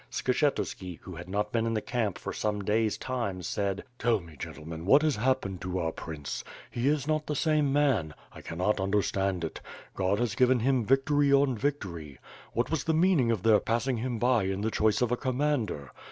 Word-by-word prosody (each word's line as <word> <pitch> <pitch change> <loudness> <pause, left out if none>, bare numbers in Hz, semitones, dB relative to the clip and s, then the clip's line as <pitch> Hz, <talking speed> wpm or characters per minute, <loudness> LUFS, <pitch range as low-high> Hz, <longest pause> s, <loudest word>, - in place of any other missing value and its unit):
Skshetu§ki, 125 - -1
who 90 - -8
had 85 +2 -9
not 105 +2 -1
been 115 -1 +1
in 115 - 0
the - - +2
camp 110 -6 -1
for - - -5
some 105 -1 -2
days 110 +2 +1
time, 115 -8 -3
said: 100 +2 -2 0.2
"Tell 115 -2 +2
me, 85 -3 -13
gentlemen, 80 +3 -7
what 140 +8 +6
has 155 -2 +2
happened 110 -6 0
to 90 +1 -3
our 80 -2 0
Prince? 75 -5 -6 0.3
He 120 +2 -1
is 145 -1 +1
not 155 -1 0
the 150 - -1
same 150 -2 +2
man. 135 - +2 0.2
I - - -10
canot 90 +6 -1
understand 95 -2 0
it. 80 - -5 0.3
God 95 +1 +1
has 120 -2 0
given 125 +1 +3
him 130 -2 +2
victory 140 +2 +3
on 140 -2 +4
victory. 95 - -3 0.4
What 120 +4 0
was 160 - -1
the 160 - +2
meaning 160 -7 +3
of 110 -5 0
their 110 -2 +6
passing 120 +2 0
him 120 +1 -2
by 120 -3 +2
in 95 +1 -2
the 110 +1 0
choice 110 +3 +2
of 120 - 0
a 125 - +1
commander? 125 - -1
115 Hz, 200 wpm, -29 LUFS, 95-135 Hz, 0.4 s, what